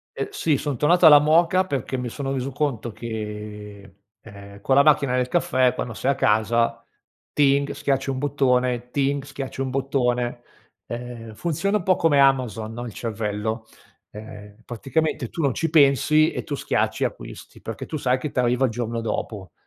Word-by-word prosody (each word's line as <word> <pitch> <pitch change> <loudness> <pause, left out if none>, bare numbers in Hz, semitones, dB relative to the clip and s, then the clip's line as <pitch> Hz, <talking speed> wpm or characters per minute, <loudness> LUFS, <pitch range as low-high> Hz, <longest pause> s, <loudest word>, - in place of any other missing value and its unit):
Eh, - - -3
sì, 155 - 0
son 145 -3 -3
tornato 175 +5 +4
alla 150 -2 +10
moka 170 +5 +3
perché 135 -5 -3
mi 125 -1 -4
sono 135 +2 -4
reso 135 0 -3
conto 130 -5 -2
che, 105 -2 -7 0.2
ehm, 100 -2 -13
con 130 +6 +1
la 140 - +6
macchina 140 -3 +3
del 125 0 0
caffè, 130 -6 +2
quando 120 - -4
sei 130 +5 0
a - - -1
casa, 115 +2 +1 0.5
ting, 140 0 +2
schiacci 135 -1 -1
un 135 - -2
bottone, 125 -3 0
ting, 140 0 0
schiacci 135 -1 -6
un 135 - -1
bottone. 125 -3 -1 0.5
Ehm, 120 -2 -7
funziona 170 - -1
un 200 - -6
po' 185 +1 +3
come 160 -5 +2
Amazon, 125 -6 +2
no, 120 +1 -6
il 120 - -6
cervello, 110 0 -3 0.4
ehm, 105 -1 -11
praticamente, 135 +2 -2
tu 170 - -5
non 140 -4 +1
ci 165 +4 -1
pensi 155 +1 +4
e - - -4
tu 145 - -4
schiacci - - -1
e - - +3
acquisti, - - -8
perché - - -6
tu - - -6
sai 130 -3 +1
che 140 +3 -5
t'arriva 125 +1 +1
il 125 - -1
giorno 115 0 -3
dopo 105 -5 -4
130 Hz, 175 wpm, -23 LUFS, 115-145 Hz, 0.5 s, alla